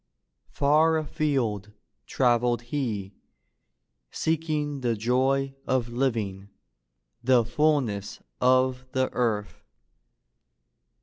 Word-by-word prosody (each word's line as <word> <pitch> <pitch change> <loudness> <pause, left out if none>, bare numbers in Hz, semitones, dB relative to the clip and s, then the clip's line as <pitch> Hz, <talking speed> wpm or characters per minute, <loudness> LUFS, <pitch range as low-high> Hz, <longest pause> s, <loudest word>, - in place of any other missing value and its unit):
Far 155 +3 +3
afield 130 -9 -1 0.3
traveled 120 -1 +2
he, 105 -9 -2 1.0
seeking 155 -3 -1
the 120 -2 0
joy 130 +5 +1
of 130 -3 0
living, 110 -6 -2 0.7
the 125 -2 +4
fulness 120 -7 0 0.2
of 130 0 +3
the 130 0 0
earth. 110 -5 -1
125 Hz, 75 wpm, -26 LUFS, 115-140 Hz, 1.0 s, the